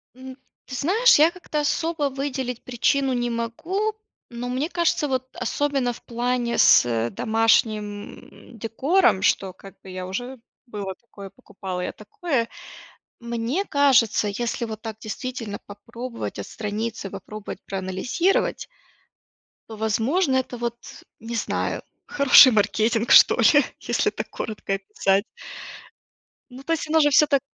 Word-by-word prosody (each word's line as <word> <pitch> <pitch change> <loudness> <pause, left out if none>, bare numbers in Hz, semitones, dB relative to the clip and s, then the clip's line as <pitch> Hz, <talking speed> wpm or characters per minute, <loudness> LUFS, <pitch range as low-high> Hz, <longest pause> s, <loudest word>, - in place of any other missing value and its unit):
М, 260 +1 -10 0.3
ты 260 - -7
знаешь, 405 - +4
я 315 +2 +7
как-то 345 -4 -4
особо 305 0 0
выделить 265 -3 -4
причину 260 +2 +1
не 240 -1 -1
могу, 330 - -2 0.4
но, 240 +1 -6
мне 265 +6 -2
кажется, 340 -4 0
вот 260 -1 -2
особенно 270 0 -1
в - - -14
плане 240 0 -1
с 115 -1 +4
домашним, 215 -2 -1
м, - - -13
декором, 260 - +2
что 190 -1 +1
как 195 +1 -15
бы 190 - -13
я 185 0 -6
уже 245 +7 -5 0.3
было 205 -5 -6
такое, 200 -4 -12
покупала 195 -6 -7
я - - -3
такое, 235 +3 -3 0.7
мне 235 +9 -2
кажется, 265 - +3
если 235 +3 -3
вот 220 -1 -7
так 220 -1 -6
действительно 220 -1 -5
попробовать 230 +4 -7
отстраниться, 215 -1 -5
попробовать 200 +1 -8
проанализировать 195 - -1 1.0
то, 220 - -8
возможно, 260 - +1
это 255 -1 -1
вот, 235 0 -3 0.4
не 230 +1 -6
знаю, 220 - -2 0.2
хороший 280 -1 +7
маркетинг 220 +2 +1
что - - +8
ли, 285 +5 +5 0.2
если - - 0
так - - -6
коротко 210 -2 -4
описать. 195 0 0 1.3
Ну, 255 +2 -11
то 330 +3 0
есть 310 - -3
оно 320 +1 +4
же 295 - +5
всё 295 +2 +5
так, 280 -2 +2
235 Hz, 135 wpm, -23 LUFS, 210-275 Hz, 1.3 s, что